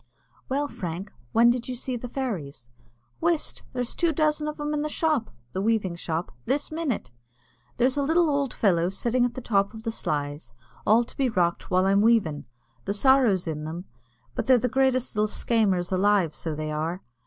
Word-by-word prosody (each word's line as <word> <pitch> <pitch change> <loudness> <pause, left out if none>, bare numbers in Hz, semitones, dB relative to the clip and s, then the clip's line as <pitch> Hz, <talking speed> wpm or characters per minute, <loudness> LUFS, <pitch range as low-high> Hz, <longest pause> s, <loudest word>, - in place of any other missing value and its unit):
"Well, 285 +2 0
Frank, 185 -4 -6 0.2
when 235 +1 +6
did 245 -1 -3
you 255 - -3
see 250 +1 -3
the 245 +1 -6
fairies?" 160 - -4 0.5
"Whist! 335 -2 0
there's 250 -2 -2
two 340 -2 +1
dozen 305 0 +1
of 300 - -4
them 295 0 -2
in 295 - 0
the 305 - -2
shop 305 -6 0 0.2
(the 190 - -2
weaving 205 -4 +1
shop) 165 0 -3
this 280 +5 -1
minute. 285 - -2 0.7
There's 255 +3 +2
a - - +2
little 325 +4 +3
ould 280 -3 0
fellow 175 -4 +2
sittin' 240 +6 0
on 245 - -2
the 255 - -6
top 200 -2 +1
of 220 - -9
the 225 - -1
sleys, 145 - -3
an' - - -28
all 225 +3 +6
to - - -11
be 265 -2 +1
rocked 175 -5 0
while 185 0 +3
I'm 195 +1 +4
weavin'. 210 -10 +2 0.4
The 200 - -1
sorrow's 235 -7 +4
in 150 -1 -3
them, 165 +4 -6 0.5
but - - -3
they're 260 -1 +7
the 250 - 0
greatest 260 -1 +1
little 210 0 +2
skamers 200 -6 +1
alive, 190 -3 +3
so 160 -2 -4
they 155 0 -3
are. 160 +4 -3
225 Hz, 195 wpm, -26 LUFS, 180-265 Hz, 0.7 s, they're